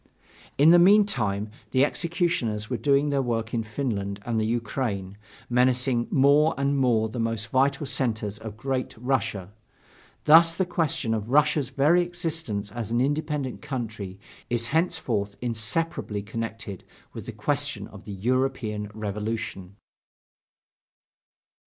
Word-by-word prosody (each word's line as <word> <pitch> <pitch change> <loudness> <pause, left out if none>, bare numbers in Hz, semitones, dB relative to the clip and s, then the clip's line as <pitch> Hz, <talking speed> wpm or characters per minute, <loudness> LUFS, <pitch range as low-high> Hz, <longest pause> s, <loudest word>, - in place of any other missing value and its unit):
In 150 +4 +7
the 175 - +8
meantime, 130 - +3 0.2
the 130 +1 +4
executioners 165 - -1
were 125 - 0
doing 140 +5 +2
their 140 -1 +2
work 115 -2 -2
in 115 - +1
Finland 105 -3 -3
and 115 -2 0
the 110 - 0
Ukraine, 110 -4 -2 0.3
menacing 125 0 +2
more 145 +3 +4
and 140 +1 +1
more 120 -5 +2
the 110 +2 -6
most 115 -1 -1
vital 140 +3 +2
centers 110 -6 -2
of 110 -1 -8
Great 130 +1 -2
Russia. 110 -6 -2 0.7
Thus 165 +2 +7
the 190 - +1
question 160 -9 0
of 110 0 -3
Russia's 150 -1 +3
very 145 +6 +3
existence 165 - -3
as 115 -2 -5
an 120 +1 +1
independent 145 0 -1
country 115 -9 -5 0.3
is 120 0 0
henceforth 115 - 0
inseparably 115 -1 -1
connected 115 -2 -6 0.3
with - - -8
the - - -4
question - - -2
of - - -13
the 105 - -6
European 115 -1 -1
revolution. 105 -2 -4
120 Hz, 130 wpm, -26 LUFS, 110-140 Hz, 0.7 s, the